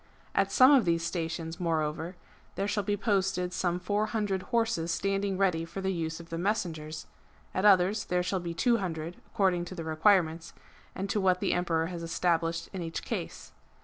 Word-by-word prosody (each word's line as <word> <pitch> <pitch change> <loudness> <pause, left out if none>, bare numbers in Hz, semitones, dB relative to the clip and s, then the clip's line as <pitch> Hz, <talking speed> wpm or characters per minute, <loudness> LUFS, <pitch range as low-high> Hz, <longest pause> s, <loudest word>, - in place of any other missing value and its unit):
At - - +2
some 255 +1 +7
of 270 -5 +6
these 165 -1 +1
stations, 165 -1 -3
moreover, 160 0 -1 0.4
there 200 - -1
shall 205 0 0
be 205 +1 -1
posted 190 -4 0
some 175 -1 0
four 205 +4 0
hundred 205 -4 -1
horses 230 -8 +1
standing 195 +3 0
ready 180 -4 +2
for 165 +4 -7
the 190 0 -1
use 160 -1 -3
of 170 0 -12
the 165 - -3
messengers; 160 -6 -2 0.5
at 185 - 0
others 195 +1 +5
there 180 0 0
shall 185 +1 -1
be 170 -1 -5
two 235 +7 +3
hundred, 170 -3 -4
according 190 -5 +1
to 185 - -8
the 165 - -5
requirements, 160 0 +2 0.4
and 195 - -3
to 210 - +1
what 185 -1 +3
the - - +1
Emperor 165 -2 +1
has 170 0 -5
established 165 0 0
in 190 - -4
each 165 -1 -4
case. - - -5
180 Hz, 185 wpm, -29 LUFS, 165-195 Hz, 0.5 s, some